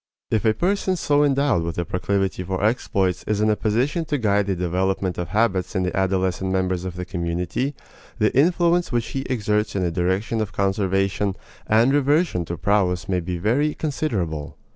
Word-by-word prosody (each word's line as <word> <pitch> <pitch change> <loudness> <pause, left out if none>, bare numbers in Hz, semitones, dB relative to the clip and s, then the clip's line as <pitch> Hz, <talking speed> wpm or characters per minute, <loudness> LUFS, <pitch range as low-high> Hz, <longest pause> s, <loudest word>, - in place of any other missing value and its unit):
If 110 0 +1
a 110 -1 +3
person 190 +1 0
so 145 -4 +2
endowed 140 -8 +2
with 85 0 -4
a 85 - -1
proclivity 95 +1 -1
for 95 +1 -3
exploits 100 -5 0
is 105 -1 0
in 110 0 +3
a - - +2
position 125 - 0
to 150 -1 -1
guide 105 -4 +1
the 95 - 0
development 90 +1 -1
of 90 - -2
habits 105 +1 0
in 95 - +1
the 90 - -2
adolescent 95 0 0
members 95 -1 0
of 90 -1 -5
the 90 0 -5
community, 90 - -2 0.4
the 110 -2 +1
influence 170 +3 +3
which 120 -3 -1
he 135 - -3
exerts 105 -4 0
in 95 - 0
the 85 - 0
direction 95 +6 0
of 105 -2 -4
conservation 95 0 0 0.3
and 115 +5 +4
reversion 145 - +2
to 85 +1 -5
prowess 95 0 +1
may 90 -2 +1
be 90 +1 -4
very 130 - +1
considerable. 95 - -3
100 Hz, 185 wpm, -23 LUFS, 90-120 Hz, 0.4 s, and